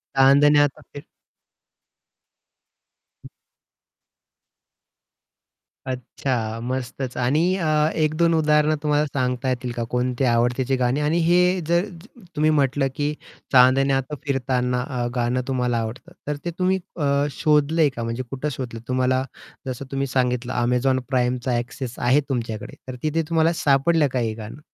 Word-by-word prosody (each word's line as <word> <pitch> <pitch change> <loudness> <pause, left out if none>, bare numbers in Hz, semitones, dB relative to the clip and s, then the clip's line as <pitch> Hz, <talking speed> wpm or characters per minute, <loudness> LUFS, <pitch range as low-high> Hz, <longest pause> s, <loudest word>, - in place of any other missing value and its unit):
चांदण्यात 145 +1 +5
फिर 145 - -9 2.2
हं. - - -11 2.6
अच्छा, 125 -3 -3
मस्तच. 130 0 -4
आणि 130 +5 +2 0.2
अ, 165 -4 -1 0.4
एक 155 0 +1
दोन 170 -1 +3
उदाहरणं 150 -1 +3
तुम्हाला 150 0 +2
सांगता 125 0 -1
येतील 125 -1 -2
का, 120 -1 -3
कोणते 125 +1 0
आवडतेची 125 +2 +1
गाणी? 125 +2 0
आणि 150 +3 +1
हे 180 +2 +3
जर 170 +3 +2 0.5
तुम्ही 155 +1 +2
म्हटलं, 140 -1 +2
की 150 +1 -1 0.4
चांदण्यात 135 +2 +4
फिरताना 125 -2 0
अ, 125 -4 -2
गाणं 125 +1 0
तुम्हाला 125 -2 0
आवडतं 115 +2 -5 0.2
तर 150 - -1
ते 170 - -1
तुम्ही 190 +1 +2 0.2
अ, 140 -1 +1
शोधलंय 150 +1 +2
का? 115 - -4
म्हणजे 115 +2 -3
कुठे 135 +3 -3
शोधलं? 120 -3 -6
तुम्हाला 130 0 +1 0.4
जसं 130 +1 -5
तुम्ही 135 0 -1
सांगितलं 125 -1 -1
Amazon 125 +2 +2
Primeचा 125 0 0
ॲक्सेस 125 +1 -5
आहे 130 +5 +3
तुमच्याकडे, 115 -4 -4
तर 130 - -6
तिथे 155 +2 +1
तुम्हाला 165 0 +3
सापडलं 145 +2 +3
का 125 - +1
हे 110 -2 -1
गाणं? 110 +5 -9
130 Hz, 130 wpm, -23 LUFS, 125-150 Hz, 2.6 s, चांदण्यात